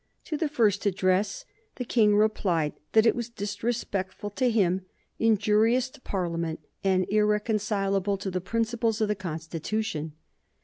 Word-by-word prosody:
To 315 - -4
the 305 0 -1
first 215 -8 +2
address 195 - +1 0.3
the 250 - -4
King 215 -3 +4
replied 185 -7 +2 0.2
that 220 0 +6
it 225 - +4
was 240 -1 -3
disrespectful 205 -2 -3
to 250 +5 +1
him, 190 -5 +2 0.4
injurious 225 +3 +3
to 290 - -16
Parliament, 170 -5 -2 0.2
and 185 -1 +2
irreconcilable 210 -2 +1
to 195 0 -4
the 185 0 -2
principles 225 +2 0
of 215 -1 +1
the - - +3
Constitution. 165 0 -4
210 Hz, 135 wpm, -27 LUFS, 185-225 Hz, 0.4 s, that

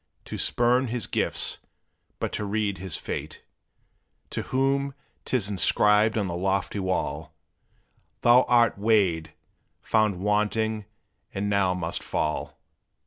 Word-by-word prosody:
To - - -6
spurn 125 +2 +2
his 120 -2 -3
gifts, - - 0 0.6
but - - -3
to - - -2
read 100 -2 -1
his 95 -3 -4
fate; - - -6 0.9
To - - -2
whom 135 +1 0 0.3
't 130 - +1
is 105 -5 -2
inscribed 105 +3 +3
on 105 - +1
the 85 - -3
lofty 95 +3 -1
wall, 95 -1 -2 0.9
"Thou 120 +1 +7
art 120 -4 +3
weighed, 100 -7 +2 0.5
found 110 -4 +1
wanting, 105 +1 0 0.5
and 100 +1 -1
now 95 -2 +2
must 85 -2 -3
fall! 75 0 -2
105 Hz, 125 wpm, -26 LUFS, 95-115 Hz, 0.9 s, Thou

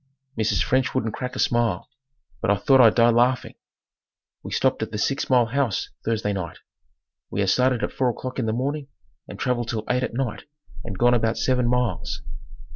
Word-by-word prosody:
Mrs. 110 -1 +1
French 130 +1 +1
wouldn't 115 -4 -1
crack 125 0 -5
a - - -5
smile, 115 -7 +1 0.5
but - - 0
I 100 - +5
thought 130 +6 +4
I'd 115 -3 +6
die 120 0 +5
laughing. 125 +2 +2 0.9
We - - -8
stopped 130 -2 +1
at 110 - -2
the 110 - -5
six 135 +6 -1
mile 125 -3 +5
house 120 -4 -1
Thursday 110 -2 -1
night. 90 -4 -5 0.7
We 100 - -2
had 95 - +1
started 125 -1 +2
at - - -2
4 130 -2 +1
o'clock 130 +2 -5
in 115 - -1
the - - +1
morning 140 +5 -2 0.4
and - - -9
traveled 120 -2 -1
till 110 -2 -2
eight 125 +1 +1
at 130 - -3
night 125 -4 -3 0.4
and 100 - -6
gone 120 +3 +4
about 115 -1 +1
seven 125 -2 +1
miles. 125 -1 -1
120 Hz, 195 wpm, -24 LUFS, 110-130 Hz, 0.9 s, I'd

